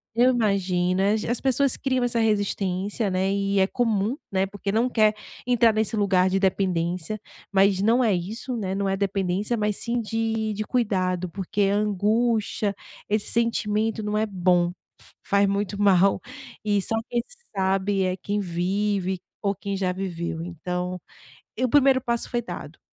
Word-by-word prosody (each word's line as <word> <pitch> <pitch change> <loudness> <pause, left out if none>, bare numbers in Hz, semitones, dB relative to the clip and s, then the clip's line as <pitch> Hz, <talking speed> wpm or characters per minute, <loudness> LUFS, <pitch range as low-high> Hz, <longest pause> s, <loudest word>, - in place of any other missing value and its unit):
Eu 245 +2 +5
imagino 190 -5 +1 0.3
as 240 - 0
pessoas 270 0 +2
criam 260 -2 0
essa 240 -1 +1
resistência, 205 -1 0
né. 190 +1 +1
E 200 0 +1
é 190 - +4
comum, 225 +1 0
né, 190 0 +1
porque 200 0 -4
não 230 +4 +2
quer 215 -3 +3 0.3
entrar 235 -2 +4
nesse 220 +1 0
lugar 190 -3 +3
de 190 +1 +1
dependência. 185 0 -1 0.3
Mas 195 0 +4
não 230 +5 +3
é 220 -4 +3
isso, 220 +8 -4
né. 190 -4 -2
Não 195 0 0
é 195 - 0
dependência, 195 +2 -1
mas 210 -1 0
sim 235 +1 -1
de 225 0 -1
de 210 +1 -3
cuidado, 185 -7 0
porque 195 +4 -3
angústia, 210 +1 +1 0.3
esse 210 0 0
sentimento 220 -1 0
não 210 0 -1
é 215 - +2
bom, 180 -3 +2 0.3
f - - -18
faz 200 0 +3
muito 200 0 -2
mal, 195 -1 +4 0.5
e 205 -1 +2
só 225 - -1
quem 240 - 0 0.3
sabe 195 +1 +1
é 185 0 -1
quem 205 +2 -2
vive 190 +1 -1 0.2
ou 200 -1 +1
quem 200 +1 -4
já 185 -1 0
viveu. 170 -3 -4
Então 180 +1 -4 0.6
e - - -2
o - - +2
primeiro 270 0 +5
passo 235 -2 -2
foi 240 - 0
dado. 235 - -8
200 Hz, 160 wpm, -25 LUFS, 190-225 Hz, 0.6 s, Eu